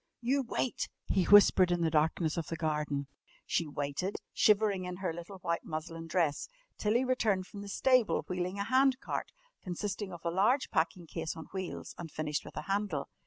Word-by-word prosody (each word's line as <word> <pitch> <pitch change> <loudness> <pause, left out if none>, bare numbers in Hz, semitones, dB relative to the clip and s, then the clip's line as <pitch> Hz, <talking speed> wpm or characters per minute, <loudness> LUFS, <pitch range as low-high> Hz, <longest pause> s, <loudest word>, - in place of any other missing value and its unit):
"You 265 +4 +1
wait!" 250 0 -2 0.2
he 185 -2 +2
whispered 195 -2 +7
in 175 -1 +1
the 165 -1 +2
darkness 160 +1 +2
of 170 - -3
the 165 - -3
garden. 150 -3 -1 0.4
She 170 - 0
waited, 145 +6 -3 0.2
shivering 205 -3 +3
in 180 0 -4
her 185 -3 -2
little 175 +4 -8
white 170 -2 -2
muslin 165 +1 -5
dress, 165 - 0 0.3
till 210 +1 +1
he 245 - +4
returned 215 -7 +1
from 200 +1 -9
the 205 - -7
stable 255 +1 +3
wheeling 180 +1 -2
a 200 - 0
hand 260 +3 +3
cart, - - -4 0.3
consisting 195 +2 -4
of 170 -1 -10
a 170 - +1
large 215 +10 +2
packing 170 +2 0
case 160 - -4
on 160 - -7
wheels 190 -2 -5
and 170 -2 -6
finished 150 -1 -2
with - - -11
a - - -3
handle. 195 -8 -1
180 Hz, 190 wpm, -32 LUFS, 160-205 Hz, 0.4 s, whispered